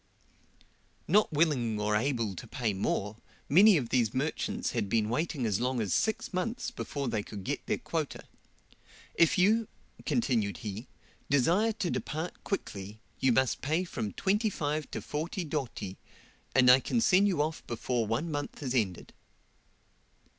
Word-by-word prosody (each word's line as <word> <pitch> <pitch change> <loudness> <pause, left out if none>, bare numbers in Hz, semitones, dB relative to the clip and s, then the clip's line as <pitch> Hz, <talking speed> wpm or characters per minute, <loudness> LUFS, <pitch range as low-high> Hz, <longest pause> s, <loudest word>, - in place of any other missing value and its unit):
Not 210 +5 +4
willing 140 -9 +1
or 105 0 +1
able 115 -4 0
to - - -8
pay 115 -4 -1
more, 100 +2 -2 0.3
many 195 +5 +7
of 125 -6 -2
these 120 -2 +1
merchants 145 +4 -1
had 100 - -2
been 110 0 +1
waiting 135 +1 -1
as 105 -3 +1
long 125 +1 0
as 105 -5 0
six 225 -1 0
months 230 +8 -2
before 140 - -4
they 110 -3 0
could 100 -1 -8
get - - -3
their - - +1
quota. - - -3 0.9
"If 165 +3 +4
you," 215 +5 +4 0.4
continued 115 - 0
he, 105 +4 -5 0.4
"desire 175 - +3
to 195 -5 -2
depart 160 +3 -4
quickly, 105 - -4 0.2
you 130 - +3
must 130 0 +2
pay 160 +6 +1
from 110 - -4
25 185 -8 0
to - - -5
40 165 +5 -3
doti, 135 - -4 0.6
and 125 -1 +7
I 130 - +7
can 235 - 0
send 200 -3 +5
you 180 -7 0
off 155 +1 -3
before 120 -1 -1
one 125 +10 -1
month 145 0 -4
is 130 -2 -2
ended." 105 -8 -1
135 Hz, 155 wpm, -30 LUFS, 110-175 Hz, 0.9 s, many